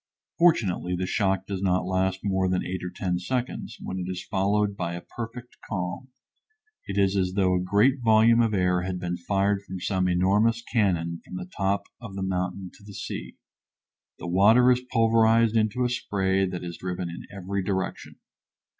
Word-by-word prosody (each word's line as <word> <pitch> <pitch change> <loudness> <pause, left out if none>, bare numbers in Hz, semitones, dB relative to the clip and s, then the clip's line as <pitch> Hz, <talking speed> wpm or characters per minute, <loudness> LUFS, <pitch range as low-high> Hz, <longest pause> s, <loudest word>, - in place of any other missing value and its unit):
Fortunately 100 - +3
the 90 +1 -2
shock 95 0 0
does 95 -1 -4
not 90 -2 +1
last 95 0 0
more 95 -2 +1
than 90 0 0
eight 95 +1 -4
or 90 - -3
ten 90 -1 -2
seconds, 125 +6 -3
when 95 - -5
it 90 0 -4
is 90 -1 -5
followed 100 +1 +1
by 85 -3 -3
a 85 - -6
perfect 120 +3 -8
calm. 90 +4 -3 0.8
It 100 - -4
is 100 -1 +3
as 90 -1 0
though 95 -2 +2
a 90 - +1
great 105 +9 +3
volume 115 +1 +5
of 115 -2 +1
air 90 -1 +2
had 90 0 -3
been 90 -1 -2
fired 100 +3 0
from 95 -2 -7
some 95 0 0
enormous 100 +6 +2
cannon 85 -8 0
from - - -10
the 90 0 -5
top 100 +1 0 0.2
of 110 -5 -8
the 95 - -3
mountain 90 0 -3
to - - -19
the 100 -1 -11
sea. - - -6 0.8
The - - -8
water 105 +8 +5
is 125 0 +2
pulverized 115 0 +4
into 110 +3 +1
a - - +1
spray 95 -5 0
that 90 -1 -5
is 85 -1 -6
driven 90 -1 -3
in 85 0 -8
every 100 0 -3
direction. 95 0 -3
95 Hz, 185 wpm, -26 LUFS, 90-105 Hz, 0.8 s, volume